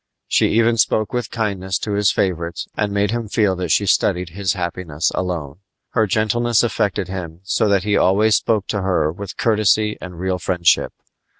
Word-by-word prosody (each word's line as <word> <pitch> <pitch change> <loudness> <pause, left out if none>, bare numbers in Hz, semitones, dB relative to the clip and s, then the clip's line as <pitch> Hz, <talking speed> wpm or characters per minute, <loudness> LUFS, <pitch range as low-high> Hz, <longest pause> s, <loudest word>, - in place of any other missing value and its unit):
She - - +3
even 115 +1 +3
spoke 110 +1 +1
with 120 -2 -2
kindness 100 -4 -2
to 105 - -4
his 100 -1 +3
favorites 85 -3 -2
and 105 -1 -1
made 100 0 0
him 115 -1 -3
feel 105 -2 +1
that 90 -2 -3
she 100 - +2
studied 90 -2 +1
his 95 +2 -1
happiness 85 -3 -2
alone. 85 -5 -4 0.3
Her 110 -3 +2
gentleness 110 +3 +1
affected 100 -5 -1
him 90 -3 -7
so 105 +3 +1
that 100 -2 +2
he 105 0 +1
always 105 +3 +3
spoke 105 -2 +1
to 105 - -1
her 90 -5 +1
with 100 +3 -8
courtesy 110 -1 +2
and 90 -2 -8
real 95 0 -1
friendship. 85 -2 +2
100 Hz, 180 wpm, -20 LUFS, 90-110 Hz, 0.3 s, She